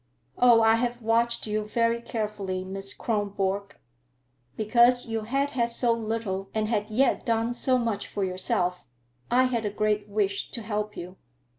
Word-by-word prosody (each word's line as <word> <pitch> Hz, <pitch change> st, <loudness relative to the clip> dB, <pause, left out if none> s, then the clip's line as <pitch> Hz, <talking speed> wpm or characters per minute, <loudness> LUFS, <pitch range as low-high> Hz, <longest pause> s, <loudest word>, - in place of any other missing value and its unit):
"Oh, 240 Hz, -2 st, +6 dB
I 225 Hz, 0 st, +5 dB
have 240 Hz, 0 st, -2 dB
watched 235 Hz, +1 st, +1 dB
you 215 Hz, 0 st, -1 dB
very 230 Hz, +1 st, +1 dB
carefully, 210 Hz, -5 st, -3 dB
Miss 195 Hz, +1 st, -4 dB
Kronborg. 200 Hz, -2 st, -2 dB, 0.8 s
Because 240 Hz, +3 st, +4 dB
you 225 Hz, -2 st, -2 dB
had 275 Hz, +5 st, 0 dB
had 235 Hz, -3 st, 0 dB
so 235 Hz, 0 st, +1 dB
little 220 Hz, -4 st, -3 dB
and 215 Hz, -1 st, +1 dB
had 210 Hz, -1 st, -1 dB
yet 255 Hz, +5 st, +2 dB
done 230 Hz, 0 st, 0 dB
so 255 Hz, +1 st, +1 dB
much 230 Hz, -4 st, -2 dB
for 200 Hz, -, -3 dB
yourself, 180 Hz, -1 st, -1 dB, 0.5 s
I 250 Hz, +1 st, +4 dB
had 245 Hz, -3 st, 0 dB
a 210 Hz, -, 0 dB
great 210 Hz, 0 st, -1 dB
wish 200 Hz, -1 st, -1 dB
to 230 Hz, -, -6 dB
help 210 Hz, 0 st, -3 dB
you. 180 Hz, +2 st, -8 dB
220 Hz, 160 wpm, -27 LUFS, 205-235 Hz, 0.8 s, Oh